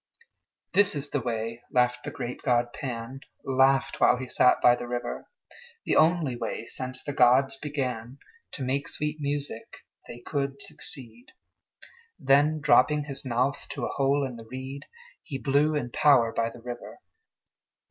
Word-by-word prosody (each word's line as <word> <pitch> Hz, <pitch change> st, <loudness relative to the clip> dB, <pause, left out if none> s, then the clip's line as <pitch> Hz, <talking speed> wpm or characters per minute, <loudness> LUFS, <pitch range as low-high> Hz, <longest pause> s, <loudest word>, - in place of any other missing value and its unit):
"This 205 Hz, -5 st, +5 dB
is 145 Hz, 0 st, -4 dB
the 145 Hz, -, 0 dB
way," 115 Hz, 0 st, -3 dB
laughed 125 Hz, 0 st, +1 dB
the -, -, -2 dB
great 120 Hz, +1 st, -6 dB
god 120 Hz, -1 st, +1 dB
Pan 125 Hz, 0 st, -5 dB, 0.2 s
(Laughed 135 Hz, 0 st, +2 dB
while 125 Hz, -, +5 dB
he 130 Hz, -, -5 dB
sat 125 Hz, -, +4 dB
by 120 Hz, -, +6 dB
the 120 Hz, -, -7 dB
river), 120 Hz, 0 st, -4 dB, 0.6 s
"The -, -, +1 dB
only 160 Hz, -5 st, +3 dB
way, 120 Hz, -, -4 dB
since 130 Hz, 0 st, -6 dB
gods 135 Hz, -1 st, +3 dB
began 130 Hz, -4 st, -4 dB, 0.4 s
To 135 Hz, -, -4 dB
make 135 Hz, +2 st, -1 dB
sweet 150 Hz, 0 st, -3 dB
music, 145 Hz, -5 st, -5 dB, 0.2 s
they 120 Hz, -, -9 dB
could 140 Hz, 0 st, -3 dB
succeed." 120 Hz, -4 st, -8 dB, 0.8 s
Then, 145 Hz, +3 st, +3 dB
dropping 145 Hz, +1 st, +4 dB
his 140 Hz, -1 st, -4 dB
mouth 130 Hz, +2 st, -1 dB
to -, -, -4 dB
a -, -, -4 dB
hole 140 Hz, +1 st, +1 dB
in 125 Hz, -3 st, -6 dB
the 115 Hz, -, -11 dB
reed, 130 Hz, +2 st, -7 dB, 0.4 s
He 135 Hz, -, -6 dB
blew 145 Hz, +3 st, +2 dB
in 125 Hz, -5 st, -2 dB
power 120 Hz, -6 st, +4 dB
by 115 Hz, 0 st, 0 dB
the 115 Hz, -, -13 dB
river. 120 Hz, 0 st, -8 dB
130 Hz, 155 wpm, -27 LUFS, 120-140 Hz, 0.8 s, by